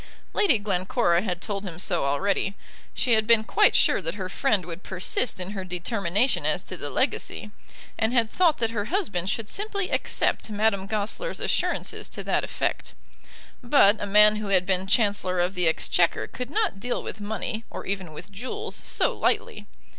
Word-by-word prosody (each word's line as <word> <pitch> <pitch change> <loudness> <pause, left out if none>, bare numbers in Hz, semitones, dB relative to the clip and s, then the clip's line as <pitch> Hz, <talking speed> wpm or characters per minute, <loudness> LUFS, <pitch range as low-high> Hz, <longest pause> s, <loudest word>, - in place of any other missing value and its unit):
"] - - -35
Lady 395 - +4
Glencora 185 -2 +1
had 180 -4 -3
told 200 -2 -3
him 175 -5 -7
so 175 -5 -1
already. 195 +7 0 0.4
She 250 - 0
had 220 -1 +2
been 230 -2 +5
quite 420 - +3
sure - - +3
that 165 +1 -3
her 185 -3 -5
friend 205 -4 +1
would 170 +1 -7
persist 190 +5 -1
in 180 +2 -3
her 195 -2 -5
determination 190 +5 0
as - - 0
to - - -7
the - - -5
legacy, 210 - -2 0.5
and 220 +1 +2
had 235 -3 +2
thought 340 -5 +3
that 225 -1 0
her 205 -3 -2
husband 205 - -1
should 220 +1 -2
simply 400 - -2
accept - - 0
Madame 205 -2 0
Goesler's 220 - -3
assurances - - -1
to - - -6
that - - 0
effect. - - -3 0.7
But 240 -5 +4
a 205 - -2
man 210 +1 +6
who 215 -1 -4
had 185 -2 +3
been 190 0 +1
Chancellor 200 -3 +1
of 175 +2 +1
the 180 -3 +2
Exchequer 170 +1 +2
could 250 0 -7
not 410 - -1
deal 245 +4 -2
with 215 - -7
money, 220 +2 -4
or - - -7
even 190 -4 -4
with 155 - -10
jewels, 260 - -5
so - - 0
lightly. 470 +2 -1
205 Hz, 185 wpm, -25 LUFS, 185-235 Hz, 0.7 s, man